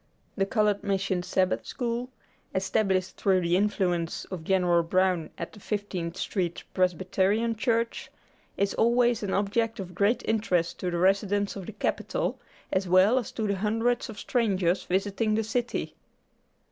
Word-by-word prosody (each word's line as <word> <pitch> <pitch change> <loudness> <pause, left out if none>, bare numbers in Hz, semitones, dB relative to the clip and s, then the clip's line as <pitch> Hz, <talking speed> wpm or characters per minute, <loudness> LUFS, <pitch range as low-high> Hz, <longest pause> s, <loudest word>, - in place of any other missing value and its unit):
The 195 -1 0
Colored 210 -1 +1
Mission 190 -2 0
Sabbath 185 +1 0
School, 240 0 -3 0.5
established 190 0 0
through 190 -2 +2
the 170 0 +1
influence 180 -4 0
of 180 -4 -5
Gen. 190 +2 +2 0.2
Brown 185 -3 +2
at 170 - -6
the 210 - -12
Fifteenth 190 -5 -3
Street 180 -5 -2
Presbyterian 190 +5 +1
Church, 230 0 -1 0.5
is 200 0 +1
always 240 0 +3
an 200 -2 -2
object 220 +3 0
of 180 -2 -6
great 200 +6 +2
interest 190 -6 0
to 180 - -1
the 175 - -2
residents 200 +2 +2
of 195 -3 -7
the 220 - -6
Capital, - - -2 0.3
as 190 0 +1
well 190 +8 +5
as 240 - -6
to 220 - -2
the 200 -1 0
hundreds 225 +5 0
of 215 - -8
strangers 190 -6 +1
visiting 200 +3 0
the 225 - +1
city. 240 +3 -2
200 Hz, 150 wpm, -27 LUFS, 185-220 Hz, 0.5 s, well